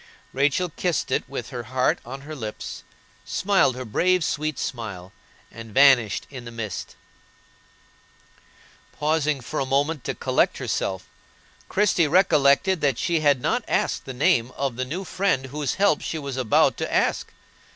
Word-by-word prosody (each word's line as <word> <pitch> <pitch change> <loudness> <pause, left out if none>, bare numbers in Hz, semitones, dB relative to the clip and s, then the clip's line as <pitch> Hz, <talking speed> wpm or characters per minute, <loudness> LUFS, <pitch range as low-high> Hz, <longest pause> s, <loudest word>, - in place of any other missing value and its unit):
Rachel 145 +6 +1
kissed 170 +1 -2
it - - -1
with - - -6
her - - -4
heart - - 0
on 135 +3 -8
her 155 +2 -8
lips, 110 -6 -7 0.4
smiled 190 -10 +2
her 130 0 -6
brave 180 +10 +2
sweet 155 0 -2
smile, 100 -7 -5 0.4
and 115 -2 -11
vanished 130 -7 +5
in 130 -3 -8
the 120 - -8
mist. 115 -5 -6 2.0
Pausing 150 -3 0
a 135 - -2
moment 140 +1 0
to - - -2
collect - - +1
herself, 95 -1 -3 0.6
Christie 190 -5 +2
recollected 160 +1 +3
that 140 -5 +1
she 170 -2 0
had 145 -4 +3
not - - 0
asked - - 0
the 130 - -6
name 120 -2 +2
of 135 -3 -1
the 130 +1 -2
new 170 +9 -4
friend 185 -8 0
whose 140 0 -3
help 200 -6 +2
she 160 - -4
was 140 -3 -5
about 130 -4 +3
to - - -3
ask. - - 0
140 Hz, 150 wpm, -24 LUFS, 125-160 Hz, 2.0 s, vanished